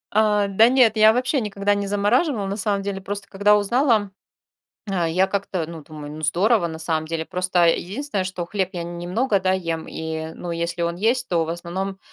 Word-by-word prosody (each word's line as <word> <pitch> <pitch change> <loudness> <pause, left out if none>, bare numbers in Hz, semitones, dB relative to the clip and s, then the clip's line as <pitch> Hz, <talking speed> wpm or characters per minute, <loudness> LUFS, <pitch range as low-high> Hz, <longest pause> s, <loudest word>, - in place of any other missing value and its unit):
А, 210 -1 +3
да 215 +4 +5
нет, 250 -4 +4
я 215 0 +7
вообще 255 +3 0
никогда 205 -1 0
не 200 0 -2
замораживала 210 - +1
на 195 +1 -3
самом 200 -1 -1
деле, 195 -1 -4
просто, 200 +1 -5
когда 205 +1 +3
узнала, 215 -1 +2 0.8
а, 180 -3 0
я 185 +4 +2
как-то, 190 -4 -2
ну, 165 -2 -9
думаю: 150 -1 -9
"Ну, 155 - -8
здорово 180 +6 +2
на 160 -1 -7
самом 160 -1 -1
деле". 160 0 -3
Просто, 180 -1 +1
э, 165 - +4
единственное, 205 +1 -3
что 185 -2 -4
хлеб 190 0 -2
я 175 -2 -4
н 170 0 -7
немного, 200 +4 0
да, 185 0 +2
ем, 165 -4 -2
и, 160 0 -5
ну, 175 - -6
если 170 +1 -2
он 170 0 -1
есть, 235 +6 +1
то 170 -2 +1
в 160 - -5
основном, 185 +3 -4
195 Hz, 210 wpm, -22 LUFS, 170-210 Hz, 0.8 s, я